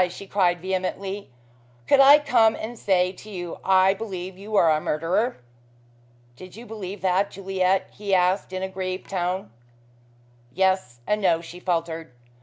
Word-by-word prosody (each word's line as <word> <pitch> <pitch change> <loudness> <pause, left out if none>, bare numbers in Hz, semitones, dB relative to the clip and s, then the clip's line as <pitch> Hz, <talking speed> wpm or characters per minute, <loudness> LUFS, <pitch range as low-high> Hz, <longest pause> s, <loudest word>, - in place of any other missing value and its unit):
she 190 +3 -9
cried 180 -3 +1
vehemently. 190 +2 -3 0.6
"Could 280 - +5
I 275 +2 +9
come 240 -7 +3
and 230 +2 -7
say 185 -2 +2
to 205 +3 -14
you, 175 -4 -6
I 190 0 +4
believe 190 -3 -6
you 205 +3 -6
are 170 -5 +5
a 155 0 +1
murderer?" 170 +12 0 1.0
"Did 185 +7 -12
you 235 +2 -10
believe 205 -4 -7
that, 190 +2 +1
Juliet?" 190 -1 0
he 205 -1 -6
asked 185 +1 +1
in 185 0 -4
a - - -1
grieved 185 0 -5
tone. 185 - -2 1.0
"Yes 185 -9 0
and 210 0 0
no," 175 -4 +3
she 170 +1 -11
faltered. 165 -4 -2
190 Hz, 155 wpm, -24 LUFS, 180-200 Hz, 1.0 s, I